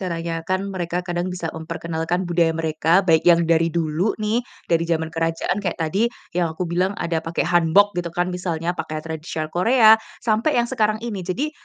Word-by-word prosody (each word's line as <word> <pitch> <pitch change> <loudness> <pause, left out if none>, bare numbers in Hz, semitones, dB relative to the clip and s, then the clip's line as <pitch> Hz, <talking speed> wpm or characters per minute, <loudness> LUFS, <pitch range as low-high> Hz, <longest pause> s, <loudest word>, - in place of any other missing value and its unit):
caranya 170 -2 -3 0.2
kan 185 0 +1
mereka 175 -1 -3
kadang 175 0 -2
bisa 170 -2 -4
memperkenalkan 165 +1 -3
budaya 170 -1 +2
mereka, 160 +3 +2
baik 160 -1 +4
yang 170 0 +6
dari 165 0 +4
dulu 165 +5 0
nih, 215 +3 +1 0.3
dari 165 -1 +3
zaman 160 -1 0
kerajaan, 165 +3 -1
kayak 180 -4 -2
tadi, 195 +9 +1 0.3
yang 175 0 +1
aku 180 - -3
bilang 185 +3 +1
ada 165 -1 -1
pakai 165 +1 -2
Hanbok 175 +4 +4
gitu 175 - -5
kan 175 +1 0
misalnya, 175 -2 -2
pakaian 155 0 -4
tradisional 160 -1 -5
Korea, 220 +5 +5 0.3
sampai 230 +7 +1
yang 240 0 +2
sekarang 215 -4 +1
ini. 210 -5 -4
Jadi, 270 +12 -1
175 Hz, 180 wpm, -22 LUFS, 165-190 Hz, 0.3 s, yang